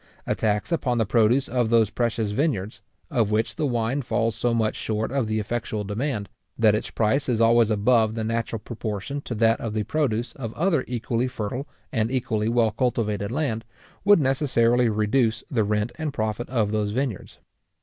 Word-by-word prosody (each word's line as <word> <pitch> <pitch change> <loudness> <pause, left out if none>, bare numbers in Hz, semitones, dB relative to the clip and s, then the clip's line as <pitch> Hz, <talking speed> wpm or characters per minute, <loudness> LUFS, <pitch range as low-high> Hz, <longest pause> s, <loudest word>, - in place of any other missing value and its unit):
A - - +1
tax 105 +6 -1
upon 130 -7 0
the 115 - +2
produce 120 +5 +3
of 120 -2 0
those 110 -2 +3
precious 115 -3 -1
vineyards, 105 - -1 0.3
of 115 -7 +2
which 110 +1 0
the 155 -3 0
wine 120 +2 0
falls 115 -3 0
so 120 - 0
much 115 -2 +1
short 110 +1 -2
of 135 -4 0
the 110 0 -1
effectual 110 0 -2
demand, 105 +1 -2 0.3
that 110 -2 +5
its 105 - -2
price 120 +6 +1
is 115 -3 +1
always 115 -1 +5
above 110 +1 +3
the 110 - -2
natural 115 0 -2
proportion 110 +4 -5
to 120 - -5
that 115 +1 +3
of 110 -2 -4
the 110 - 0
produce 120 -3 -1
of 115 -5 -6
other 165 -5 +1
equally 120 0 -1
fertile 125 +3 -4 0.2
and 110 0 0
equally 110 -4 -1
well 115 -2 +3
cultivated 105 -3 -1
land, 125 -5 -1 0.4
would 205 -1 +6
necessarily 125 -4 +2
reduce 110 +1 +1
the 115 -5 +2
rent 105 +2 0
and 155 -3 -3
profit 110 0 -2
of 110 -5 0
those 105 -1 -1
vineyards. 125 -5 -3
115 Hz, 180 wpm, -24 LUFS, 110-125 Hz, 0.4 s, would